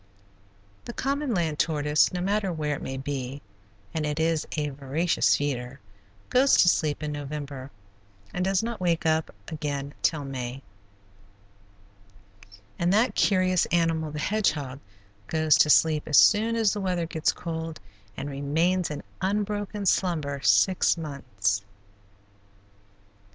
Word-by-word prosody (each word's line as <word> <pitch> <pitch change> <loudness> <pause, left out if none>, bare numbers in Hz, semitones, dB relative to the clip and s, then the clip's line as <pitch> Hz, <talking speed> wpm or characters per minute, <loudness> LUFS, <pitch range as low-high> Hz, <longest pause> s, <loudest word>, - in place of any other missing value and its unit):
The 235 - -6
common 280 +1 -1
land 165 -7 -1
tortoise, 150 -1 +2
no 180 - -3
matter 200 +1 0
where 150 -3 -2
it - - -8
may 130 - -5
be, 135 0 -4 0.5
and 160 - -1
it 150 +1 -2
is 160 -1 +1
a 150 -1 0
voracious 145 +5 +1
feeder, 135 -2 -3 0.5
goes 265 +2 +5
to 180 - +6
sleep 155 -3 0
in 150 - -2
November 145 -2 -6 0.6
and 180 - -1
does 195 +2 +1
not 230 -3 -4
wake 170 -3 0
up 160 0 +1 0.2
again 145 -2 -4
till 155 -3 +1
May, 130 0 -5 2.2
and 170 +1 +2
that 220 +5 +3
curious 185 -2 +2
animal, 165 -2 +1
the 150 - -6
hedgehog, 150 -8 -1 0.5
goes 155 -2 +3
to 150 - +5
sleep 155 0 +4
as 150 - +4
soon 225 +2 +5
as 225 -3 +2
the 205 - -3
weather 180 -3 -1
gets 160 -1 0
cold 165 -2 -5 0.4
and 140 - -4
remains 160 +6 0
in 150 - -6 0.2
unbroken 205 +1 -2
slumber 155 -7 0
six 100 - +3
months. 120 - -2
160 Hz, 135 wpm, -26 LUFS, 145-185 Hz, 2.2 s, to